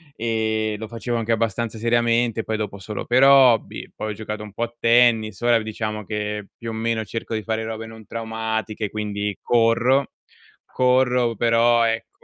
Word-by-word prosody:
e 110 -1 -1
lo 110 - -6
facevo 120 +1 -3
anche 115 0 -2
abbastanza 115 0 -1
seriamente, 115 0 +1
poi 110 - -2
dopo 105 -2 -4
solo 105 +1 -6
per 130 +2 +3
hobby, 135 -4 +4
poi 110 - -4
ho - - -4
giocato 105 0 -6
un 105 -2 -11
po' 115 - -3
a 120 0 -5
tennis, 115 -3 +3
ora 120 -1 +4
v - - -6
diciamo 110 -1 -4
che 105 0 -4
più 115 -1 -6
o - - -4
meno 110 0 -1
cerco 115 +2 -5
di 110 - -2
fare 110 0 -2
robe 110 0 -5
non 110 -1 -12
traumatiche, 110 -2 -3
quindi 105 -1 -3
corro. 120 +3 +2 0.5
Corro 125 -2 +2
però 115 +1 +3
ecco 115 0 -2
115 Hz, 175 wpm, -22 LUFS, 110-120 Hz, 0.5 s, hobby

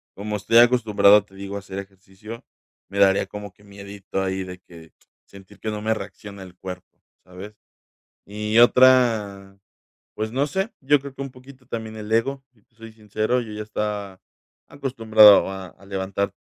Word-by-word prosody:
Como 105 +1 -4
estoy 110 +4 +2
acostumbrado, 110 -4 +5
te 95 - -21
digo, 100 +1 -7
a - - -4
hacer 95 -1 -8
ejercicio, 100 +3 -12 0.4
me 100 - -7
daría 100 0 +4
como 105 -1 -9
que 100 - -25
miedito 100 -1 -7
ahí 95 0 -2
de 90 0 -9
que 85 -3 -16 0.3
sentir 100 +1 -16
que 110 - -4
no 105 0 -5
me 110 +1 +1
reacciona 100 -1 -9
el 90 -1 -14
cuerpo, 90 -1 -10 0.2
¿sabes? 95 +3 -11 0.7
Y 105 +2 -1
otra, 115 -6 +4 0.6
pues, 110 +1 -3
no 135 +3 0
sé, 190 - -2
yo 145 +2 +3
creo 140 0 -10
que 140 - -8
un 135 - -5
poquito 130 0 -17
también 110 -2 -6
el 105 0 -8
ego, 135 +5 0
si 110 -4 -31
te 120 - -45
soy 115 0 -12
sincero, 110 +3 -1
yo 110 -3 -8
ya 105 - -6
estaba 105 -3 -4 0.5
acostumbrado 110 -7 +5
a 95 -1 -7
a 100 - -19
levantar 100 0 -3
105 Hz, 175 wpm, -23 LUFS, 100-115 Hz, 0.7 s, acostumbrado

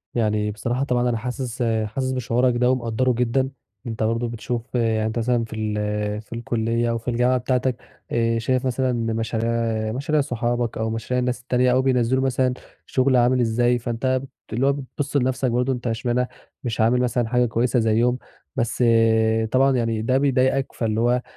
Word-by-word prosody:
يعني 105 -2 +1
بصراحة 120 +5 -2
طبعًا 125 -2 +1
أنا 115 - 0
حاسس 125 +1 -4 0.2
حاسس 130 +4 -2
بشعورك 125 0 +1
ده 125 +1 +3
ومقدره 125 0 0
جدًا، 125 +3 +1 0.4
أنت 115 -1 -3
برضه 115 +2 0
بتشوف 120 +2 -5
يعني 110 -2 +1
أنت 110 +2 -2
مثلًا 120 0 +1
في 110 - -9
ال 105 -1 -2
في 110 - -12
الكلية 115 0 -1
أو 115 - 0
في 115 - -12
الجامعة 125 +1 +2
بتاعتك 125 0 0 0.3
آآ، 115 -1 +1
شايف 130 +3 0
مثلًا 130 0 0 0.2
مشاريع 115 0 -1 0.4
مشاريع 145 +4 0
صحابك 120 -2 -1
أو 110 0 -1
مشاريع 115 +3 -2
الناس 125 0 -1
التانية 125 0 +2
أو 130 +1 +3
بينزلوا 130 0 +2
مثلًا 130 -1 +1 0.3
شغل 130 0 +2
عامل 125 +1 +4
إزاي، 120 +1 +2
فأنت 130 +2 -1 0.3
اللي 125 +4 +1
هو 140 - +4
بتبص 140 +1 -3
لنفسك 130 -1 0
برضه 125 +2 +1
أنت 125 0 -5
اشمعنى 120 +2 0 0.4
مش 115 -2 -2
عامل 125 +3 +3
مثلًا 120 -2 0
حاجة 125 +1 +2
كويسة 120 +2 +1
زيهم، 115 +3 +2 0.4
بس 120 +1 0 0.7
طبعًا 135 +1 +4
يعني 115 -2 0
ده 130 +4 +2
بيضايقك 135 -1 +1
فاللي 110 -1 -1
هو 125 +1 +2
120 Hz, 170 wpm, -23 LUFS, 115-130 Hz, 0.7 s, عامل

